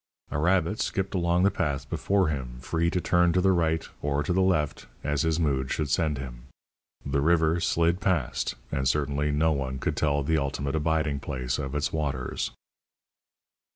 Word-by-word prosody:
A 70 - -1
rabbit 90 +4 +2
skipped 95 0 -1
along 85 -1 +2
the 100 - +4
path 70 -6 -2
before 95 +5 +1
him, 65 -5 -4
free 80 +6 0
to 90 - 0
turn 85 -1 +3
to 90 - +3
the 95 +1 +4
right 80 -2 +1
or 75 0 0
to 90 - 0
the 95 - +3
left 80 -6 0 0.2
as 75 -1 0
his 80 0 +1
mood 70 -5 0
should 75 -3 -1
send 75 -1 +1
him. 60 -2 -8 0.6
The 70 0 0
river 80 +1 +3
slid 85 +2 +1
past, 85 -10 0 0.2
and 65 -2 0
certainly 70 +1 +1
no 75 +2 +2
one 65 -3 -2
could - - -2
tell 70 -2 +1
the 80 +2 +2
ultimate 70 0 -2
abiding 80 -2 0
place 65 -3 -3
of 70 -1 -4
its 75 0 -1
waters. 70 -5 -2
75 Hz, 180 wpm, -27 LUFS, 70-85 Hz, 0.6 s, the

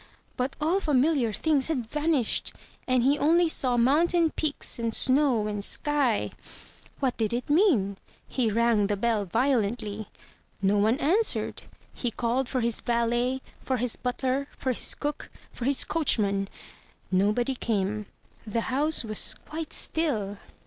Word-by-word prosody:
But 255 +1 -2
all 325 +6 +1
familiar 285 - +1
things 290 +4 +1
had 275 -8 -2
vanished, 295 -1 -1 0.3
and 255 -2 +2
he 280 +3 +2
only 335 +3 +3
saw 255 -6 +1
mountain 320 +7 +3
peaks 300 -5 +1
and 230 -1 -1
snow 260 -5 +3
and 205 -1 -3
sky. 280 -3 +1 0.7
What 265 -3 -1
did 220 -1 -1
it 245 +4 -3
mean? 275 - +3 0.3
He 245 -4 0
rang 225 -1 +2
the 205 0 -1
bell 220 -1 0
violently. 220 -1 -1 0.5
No 200 +1 +2
one 220 +5 +2
answered. 375 +10 0 0.3
He 245 - -3
called 245 +3 -1
for 255 - -1
his 235 -1 +1
valet, 240 +2 0 0.2
for 260 - -1
his 245 0 0
butler, 260 +2 -2
for 260 - -1
his 245 - +2
cook, 295 0 -4 0.2
for 240 - -6
his 275 0 +3
coachman. 200 -11 0 0.6
Nobody 210 +7 +1
came. 210 -3 -2 0.4
The 230 +2 -1
house 300 +2 +1
was 215 -2 +2
quite 315 0 -6
still. 215 -11 0
250 Hz, 140 wpm, -26 LUFS, 220-290 Hz, 0.7 s, only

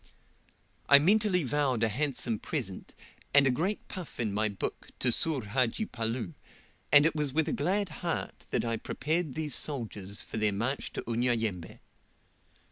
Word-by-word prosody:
I 140 - +10
mentally 190 +3 +3
vowed 130 -3 0
a - - +4
handsome 120 -2 +1
present, - - -5 0.4
and 140 -1 +8
a 135 - +4
great 185 +11 -2
puff 185 -5 -8
in 110 -4 -1
my 110 +1 +1
book, 100 - -5
to 125 - +1
Soor 145 +1 +1
Hadji 125 - 0
Palloo, 115 - -3 0.6
and 145 0 +8
it 165 - +3
was 150 -3 0
with 160 0 +2
a - - 0
glad 190 +6 0
heart 170 -2 -3
that - - 0
I 115 -1 -1
prepared 155 +5 -2
these 155 -3 -2
soldiers 105 -9 -2
for - - -7
their 105 -1 +2
march 120 +7 -2
to - - -5
Unyayembe. 115 -6 -1
130 Hz, 160 wpm, -30 LUFS, 115-155 Hz, 0.6 s, I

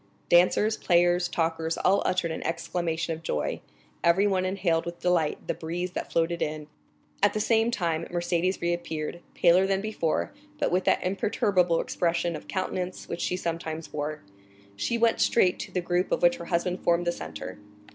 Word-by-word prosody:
Dancers, 185 +5 +4
players, 175 0 +3
talkers, 165 -1 -1
all 195 +2 +3
uttered 180 -2 0
an 160 - -4
exclamation 165 0 -2
of 160 - -8
joy—everyone 185 - -1
inhaled 185 -4 +1
with 170 0 -7
delight 175 -4 +2
the - - 0
breeze 175 +3 -4
that - - -5
floated 170 +1 0
in. 150 0 -2 0.6
At 205 - +4
the 215 - -1
same 225 +1 +3
time 170 -7 -1
Mercédès 175 +1 -1
reappeared, 170 -1 -3
paler 180 +3 +5
than 195 0 +1
before, 195 -6 -1 0.2
but 295 - 0
with 180 +1 +1
that - - +2
imperturbable 185 -2 +1
expression 170 0 0
of - - -9
countenance 185 -1 -3
which 170 - -4
she 180 - 0
sometimes 165 -2 -4
wore. 150 +1 -4 0.5
She 235 - -1
went 230 0 +2
straight 185 -6 +3
to - - -6
the 180 - -1
group 175 +2 0
of - - 0
which 175 0 +5
her 170 - -8
husband 180 +1 -1
formed 170 0 +2
the 175 - +2
centre. - - -7
175 Hz, 165 wpm, -27 LUFS, 165-185 Hz, 0.6 s, paler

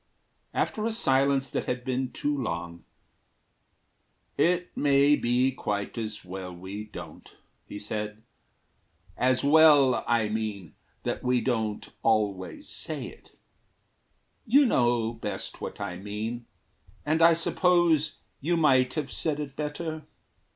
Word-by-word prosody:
After 215 +1 -1
a - - -1
silence 135 -8 +2
that - - -2
had 125 0 -3
been 130 0 -1
too 145 0 -1
long, 85 - -4 1.5
"It 175 +4 +1
may 140 0 +4
be 125 +1 +2
quite 105 -5 -3
as 110 -4 -5
well 90 0 -6
we 95 +4 -7
don't," 105 - -11 0.3
he - - -7
said; 105 +1 -5 0.9
"As 130 +1 +2
well, 145 -3 +6
I 115 -2 +2
mean, 105 -5 -4 0.3
that - - -2
we 125 0 +2
don't 110 -3 -2
always 105 -4 0
say - - -4
it. - - -19 1.1
You 280 +5 +6
know 120 - +2
best 115 - -5
what - - -6
I 90 - -4
mean, 110 +5 -5 0.6
and 155 +2 +1
I 165 0 +7
suppose 170 -2 +2 0.2
You 170 +4 0
might 130 -5 +3
have 150 -3 -3
said 150 -2 -1
it 140 -2 -5
better. 155 +1 -4
125 Hz, 125 wpm, -27 LUFS, 105-150 Hz, 1.5 s, I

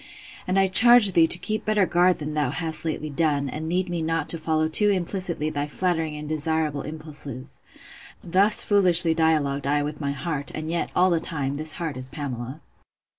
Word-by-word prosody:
And 185 +1 -1
I 195 - +4
charge 220 +2 +8
thee 165 -2 +3
to 175 - +5
keep 215 +4 -3
better 210 -2 +1
guard 175 +1 +2
than 150 0 -6
thou 150 -4 -1
hast 160 +3 -4
lately 155 -1 -4
done, 145 -2 -1
and 155 +4 -6
lead 180 +2 -1
me 175 -1 -4
not 165 0 -3
to 165 - +1
follow 155 0 -1
too 210 +6 +3
implicitly 180 -4 -1
thy 145 -1 -3
flattering 160 -1 -2
and 150 0 -8
desirable 155 -1 -2
impulses. 150 -4 -6 0.6
Thus 195 +5 +2
foolishly 180 -5 +3
dialogued 150 -4 -1
I 145 +1 0
with 150 +1 -7
my 140 -1 -2
heart; 140 +1 -5
and 155 +1 -6
yet, 170 - -3
all 185 +1 +3
the 170 - +1
time, 145 -5 -4
this 155 +2 -2
heart 160 -5 -6
is 130 0 -3
Pamela. 130 -1 -7
160 Hz, 190 wpm, -23 LUFS, 150-175 Hz, 0.6 s, charge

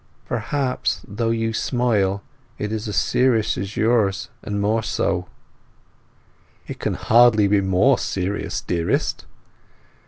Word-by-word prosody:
"Perhaps, 135 -3 -1
although 115 +3 -2
you 115 0 0
smile, 105 -6 0 0.3
it 105 - -3
is 110 0 -3
as 105 - -4
serious 125 -4 +2
as 100 +2 -5
yours, 110 -4 +1
or 110 - -7
more 105 +2 +1
so." 95 -4 -1 1.4
"It - - -8
can - - -1
hardly 115 -3 +5
be 100 0 +3
more 95 -1 +3
serious, 95 -1 -2
dearest." 85 -1 -1
105 Hz, 120 wpm, -22 LUFS, 100-115 Hz, 1.4 s, hardly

